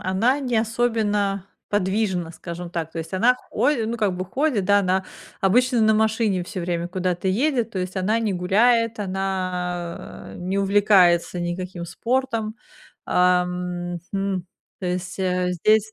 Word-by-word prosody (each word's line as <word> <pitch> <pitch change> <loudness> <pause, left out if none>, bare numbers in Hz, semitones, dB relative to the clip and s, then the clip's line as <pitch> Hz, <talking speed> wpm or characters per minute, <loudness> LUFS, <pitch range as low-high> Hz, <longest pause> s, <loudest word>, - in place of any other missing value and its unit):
она 220 +9 +1
не 250 -5 -1
особенно 215 -4 0 0.2
подвижна, 190 -3 0
скажем 170 +1 -7
так, 165 -2 -3
то 165 - -5
есть 165 +3 -6
она 240 +6 +4
ходи 270 -7 +1
ну 235 +2 -2
как 200 -5 0
бы 185 - -3
ходит, 255 - 0
да, 205 +2 +5
она 190 0 +1 0.4
обычно 240 +5 +3
на 220 0 +4
машине 220 -3 +1
всё 185 0 -5
время 170 0 -2
куда-то 180 0 -2
едет, 240 +2 +1
то 195 - -4
есть 185 +1 -4
она 210 +5 +1
не 220 -3 0
гуляет, 225 +6 +2
она 185 -3 -3
не 185 +2 -2
увлекается 195 -4 +4
никаким 175 0 -4
спортом. 230 +1 -1 0.5
Ам, 180 -1 +1 0.2
хм, 195 -2 -1 0.4
то 185 - -3
есть, 180 +1 -3
э, 180 -1 0
здесь 215 +4 +2
190 Hz, 145 wpm, -23 LUFS, 180-220 Hz, 0.5 s, да